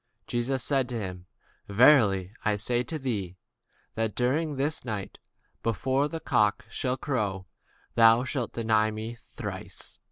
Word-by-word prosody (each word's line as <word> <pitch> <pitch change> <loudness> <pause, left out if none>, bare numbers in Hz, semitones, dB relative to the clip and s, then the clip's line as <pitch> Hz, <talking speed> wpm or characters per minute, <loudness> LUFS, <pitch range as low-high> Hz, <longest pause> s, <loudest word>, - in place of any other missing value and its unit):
Jesus 125 +2 -1
said 135 -3 +2
unto 120 - -2
him, 90 -4 -6 0.4
Verily 100 -4 +5
I 105 -1 +2
say 120 +4 0
unto 155 +6 -2
thee, 105 - -3 0.6
That 110 -2 -2
this 145 +3 0
night, 105 -5 -5 0.4
before 130 +5 +1
the 165 +2 -5
cock 105 -9 +1 0.4
crow, 105 -9 -1 0.5
thou 115 +1 +6
shalt 130 -2 -3
deny 110 -2 +2
me 110 +2 -6 0.2
thrice. - - -7
115 Hz, 125 wpm, -28 LUFS, 105-130 Hz, 0.6 s, thou